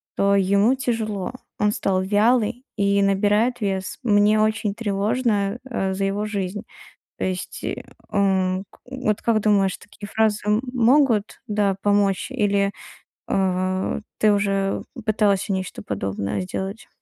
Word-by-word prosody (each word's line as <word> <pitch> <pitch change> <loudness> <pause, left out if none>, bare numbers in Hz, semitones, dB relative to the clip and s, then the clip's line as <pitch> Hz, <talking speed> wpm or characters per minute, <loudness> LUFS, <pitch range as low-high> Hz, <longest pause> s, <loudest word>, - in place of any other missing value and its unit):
что 200 0 +3
ему 200 +5 +3
тяжело, 225 -5 -2 0.3
он 210 0 +3
стал 185 -1 0
вялый 220 +4 +2
и 200 0 +2
набирает 210 +5 +2
вес. 190 -2 -2
Мне 210 -1 +4
очень 215 -1 0
тревожно, 210 0 0
э, 195 -6 -1
за 195 +1 -1
его 200 +2 -1
жизнь". 205 -1 -3 0.6
То - - -2
есть, 185 -1 -4 0.5
м, 190 -1 +1 0.2
вот 255 -6 -1
как 230 -2 +2
думаешь, 200 -3 +2
такие 205 +1 -11
фразы 215 0 +1 0.3
могут, 240 -3 +3
да, 205 -2 +1
помочь, 205 -1 +2
или, 200 -1 +1 0.6
э, 185 0 0 0.2
ты 215 -1 +4
уже 195 -1 0 0.2
пытался 205 -2 +2
нечто 185 - -4
подобное 100 0 -3
сделать? 190 - -5
200 Hz, 125 wpm, -23 LUFS, 195-215 Hz, 0.6 s, Мне